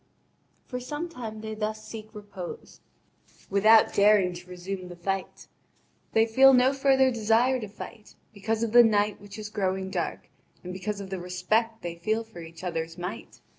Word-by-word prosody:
For 250 Hz, -, -5 dB
some 295 Hz, +7 st, -5 dB
time 225 Hz, -8 st, -7 dB
they 220 Hz, 0 st, -5 dB
thus 215 Hz, 0 st, -4 dB
seek 215 Hz, -1 st, -8 dB
repose, 200 Hz, -4 st, -9 dB, 0.7 s
without 215 Hz, +3 st, +5 dB
daring 200 Hz, -3 st, +4 dB
to 175 Hz, +1 st, -11 dB
resume 180 Hz, +1 st, -6 dB
the 175 Hz, -, -9 dB
fight. 195 Hz, +2 st, -4 dB, 0.7 s
They 225 Hz, 0 st, +5 dB
feel 265 Hz, +4 st, +6 dB
no 255 Hz, +2 st, +5 dB
further 270 Hz, -1 st, +4 dB
desire 235 Hz, +3 st, +2 dB
to 215 Hz, -, -5 dB
fight, 210 Hz, +1 st, -11 dB, 0.2 s
because 220 Hz, +2 st, -2 dB
of 230 Hz, -, -1 dB
the 240 Hz, +1 st, +9 dB
night 210 Hz, -2 st, +2 dB
which 205 Hz, 0 st, -11 dB
is 210 Hz, -1 st, -6 dB
growing 190 Hz, -2 st, -2 dB
dark, 175 Hz, -3 st, -3 dB, 0.4 s
and 180 Hz, 0 st, -6 dB
because 200 Hz, +2 st, -4 dB
of 195 Hz, -1 st, -9 dB
the 190 Hz, -, -3 dB
respect 215 Hz, +6 st, -1 dB
they 175 Hz, -1 st, -3 dB
feel 215 Hz, +7 st, -1 dB
for 220 Hz, -5 st, -13 dB
each 165 Hz, +1 st, -11 dB
other's 165 Hz, -2 st, -3 dB
might. 180 Hz, 0 st, -7 dB
210 Hz, 170 wpm, -27 LUFS, 185-225 Hz, 0.7 s, the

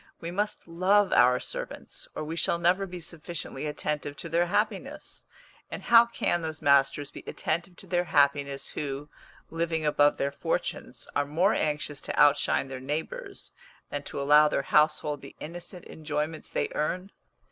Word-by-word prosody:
We 170 Hz, 0 st, -5 dB
must 205 Hz, +1 st, -2 dB
love 185 Hz, +4 st, +3 dB
our 125 Hz, +1 st, +5 dB
servants, -, -, -6 dB
or -, -, -3 dB
we 155 Hz, +2 st, -4 dB
shall 170 Hz, -, +1 dB
never 180 Hz, +3 st, +2 dB
be 180 Hz, -1 st, -7 dB
sufficiently 160 Hz, -3 st, -5 dB
attentive 150 Hz, -1 st, -3 dB
to 170 Hz, -, -6 dB
their 170 Hz, +2 st, +2 dB
happiness; 220 Hz, -, -2 dB, 0.4 s
and -, -, -6 dB
how 235 Hz, 0 st, +7 dB
can 175 Hz, -6 st, 0 dB
those 160 Hz, -1 st, -4 dB
masters 140 Hz, 0 st, +3 dB
be -, -, -10 dB
attentive 170 Hz, +3 st, -2 dB
to -, -, -12 dB
their 175 Hz, -1 st, 0 dB
happiness 140 Hz, -2 st, +2 dB
who, 145 Hz, 0 st, -5 dB, 0.4 s
living 165 Hz, -1 st, -1 dB
above 145 Hz, -1 st, +4 dB
their 140 Hz, -, 0 dB
fortunes, 140 Hz, -, -3 dB
are -, -, +2 dB
more 175 Hz, +8 st, +2 dB
anxious 150 Hz, -1 st, -1 dB
to -, -, -3 dB
outshine 145 Hz, -1 st, +4 dB
their 135 Hz, -1 st, -6 dB
neighbours 150 Hz, +5 st, -5 dB, 0.4 s
than 145 Hz, -, -2 dB
to -, -, -5 dB
allow 150 Hz, +2 st, +6 dB
their 140 Hz, -, 0 dB
household 150 Hz, 0 st, +2 dB
the 140 Hz, -, -12 dB
innocent 175 Hz, +2 st, -8 dB
enjoyments 155 Hz, 0 st, -4 dB
they -, -, -1 dB
earn? 185 Hz, +6 st, -2 dB
155 Hz, 160 wpm, -28 LUFS, 145-175 Hz, 0.4 s, how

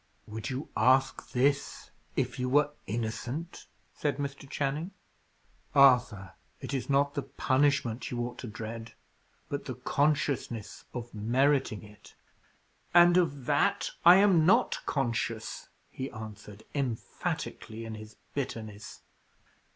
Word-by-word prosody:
"Would 110 Hz, +1 st, -5 dB
you 130 Hz, +3 st, -4 dB
ask 130 Hz, +1 st, +3 dB
this 140 Hz, +2 st, 0 dB, 0.2 s
if -, -, -1 dB
you 125 Hz, 0 st, 0 dB
were 145 Hz, +2 st, +4 dB, 0.2 s
innocent?" 120 Hz, -, -4 dB, 0.3 s
said 145 Hz, -3 st, -1 dB
Mr. 140 Hz, -1 st, -5 dB
Channing. 145 Hz, +6 st, -2 dB, 0.9 s
"Arthur, 125 Hz, -8 st, +5 dB, 0.3 s
it -, -, -6 dB
is 135 Hz, 0 st, -2 dB
not 140 Hz, +1 st, +3 dB
the 145 Hz, -, -1 dB
punishment 130 Hz, -3 st, +1 dB
you 120 Hz, -, -3 dB
ought 120 Hz, 0 st, -7 dB
to 125 Hz, -, -6 dB
dread, 115 Hz, +1 st, -7 dB, 0.5 s
but -, -, -4 dB
the -, -, -4 dB
consciousness 140 Hz, -6 st, -1 dB
of 120 Hz, -1 st, -6 dB
meriting 125 Hz, +2 st, +1 dB
it." 105 Hz, 0 st, -16 dB, 0.8 s
"And 175 Hz, 0 st, +8 dB
of 145 Hz, -8 st, +1 dB
that -, -, +2 dB
I 175 Hz, +1 st, +10 dB
am 190 Hz, -4 st, +5 dB
not 180 Hz, +4 st, +4 dB
conscious," 115 Hz, -4 st, -2 dB, 0.2 s
he 130 Hz, +1 st, -5 dB
answered, 105 Hz, -2 st, -9 dB
emphatically, 115 Hz, -3 st, -3 dB
in 110 Hz, -, -6 dB
his 110 Hz, 0 st, -10 dB, 0.2 s
bitterness. 110 Hz, -6 st, -5 dB
130 Hz, 120 wpm, -30 LUFS, 110-145 Hz, 0.9 s, I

